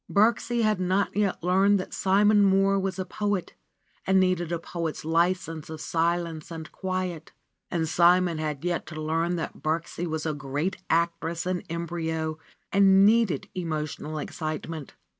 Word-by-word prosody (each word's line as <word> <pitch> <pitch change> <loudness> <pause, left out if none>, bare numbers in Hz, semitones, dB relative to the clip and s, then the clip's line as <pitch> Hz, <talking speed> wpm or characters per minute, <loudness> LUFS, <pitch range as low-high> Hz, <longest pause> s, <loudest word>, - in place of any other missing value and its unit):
Birksie 230 +3 +2
had 215 -3 +2
not 185 +2 0
yet 200 -4 0
learned 195 +3 +4
that 185 - -6
Simon 205 +2 +4
Mohr 195 0 +4
was 190 -1 -2
a 185 - -2
poet 205 -1 -2 0.5
and 190 0 +5
needed 180 -2 +1
a 170 - 0
poet's 165 -2 -5
license 165 -1 0
of 160 -1 -6
silence 165 -1 -1
and 160 -2 -7
quiet, 185 -4 -4 0.4
and 165 -2 -1
Simon 175 0 +4
had 155 0 -3
yet 175 -1 -1
to 155 -1 -7
learn 165 +3 0
that 165 - -5
Birksie 165 +2 -2
was 160 -1 -3
a 155 - 0
great 145 +6 -3
actress 170 0 0
in 185 -1 -1
embryo 160 -2 -3 0.3
and 195 0 +6
needed 215 - +3
emotional 155 -3 -4
excitement. 155 0 -5
170 Hz, 150 wpm, -26 LUFS, 160-190 Hz, 0.5 s, and